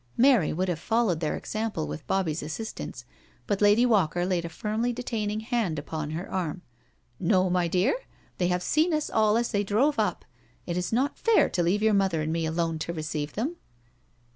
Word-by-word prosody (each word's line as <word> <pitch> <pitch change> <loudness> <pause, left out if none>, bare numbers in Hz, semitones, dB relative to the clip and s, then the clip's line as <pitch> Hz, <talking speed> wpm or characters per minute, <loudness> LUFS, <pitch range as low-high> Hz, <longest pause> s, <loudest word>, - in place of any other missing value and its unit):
Mary 245 - +5
would 185 +4 -1
have 175 -3 -1
followed 220 -4 +1
their 155 -2 -1
example 215 - -3
with 75 +1 -7
Bobbie's 170 -5 0
assistance, 190 +9 -6 0.4
but 205 -1 -1
Lady 210 +4 +5
Walker 175 -7 +2
laid 180 -2 0
a 170 - -4
firmly 215 +7 -1
detaining 220 -3 -3
hand 220 -8 -1
upon 150 +1 -4
her 165 +4 -4
arm: 180 -2 -3 0.3
" - - -42
No, 185 0 +2
my 180 -1 +2
dear, 180 +7 +2 0.5
they 175 - +2
have 180 0 0
seen 315 +2 +2
us 305 - -2
all 215 0 +3
as 235 0 0
they 205 -1 +1
drove 225 +8 +2
up. 205 -5 0 0.4
It 170 - -3
is 180 0 -2
not 260 +6 0
fair 455 -2 +4
to 175 - 0
leave 185 +5 +1
your 220 -1 +4
mother 190 -6 +2
and 160 +1 -1
me 165 -1 0
alone 165 0 -1
to 170 +2 -3
receive 155 -2 -4
them.' 285 +11 -2
190 Hz, 195 wpm, -27 LUFS, 165-220 Hz, 0.5 s, Mary